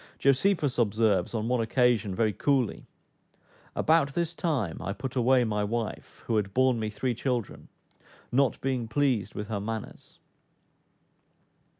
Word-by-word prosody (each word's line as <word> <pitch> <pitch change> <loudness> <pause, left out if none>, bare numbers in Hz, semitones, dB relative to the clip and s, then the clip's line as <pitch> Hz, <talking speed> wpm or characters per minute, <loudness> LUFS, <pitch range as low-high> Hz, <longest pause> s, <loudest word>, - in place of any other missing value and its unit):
Josephus 140 0 +2
observes, 110 -3 +2
on 110 0 -1
one 125 -1 +1
occasion, 115 -4 +2
very 110 -1 +1
coolly, 130 +1 0 0.9
"About 155 -4 +2
this 170 -1 -1
time 140 - -2
I 100 - -3
put 130 +4 -6
away 125 0 +4
my 105 -2 -1
wife, 115 +1 -4
who 115 - +1
had 100 -2 -2
borne 130 -2 +3
me 110 -1 -2
three 120 +4 -2
children, 120 -2 -3 0.6
not 135 0 +2
being 130 -3 -1
pleased 130 -4 0
with 105 - -4
her 105 -2 -2
manners." 110 +1 -6
120 Hz, 135 wpm, -28 LUFS, 110-130 Hz, 0.9 s, away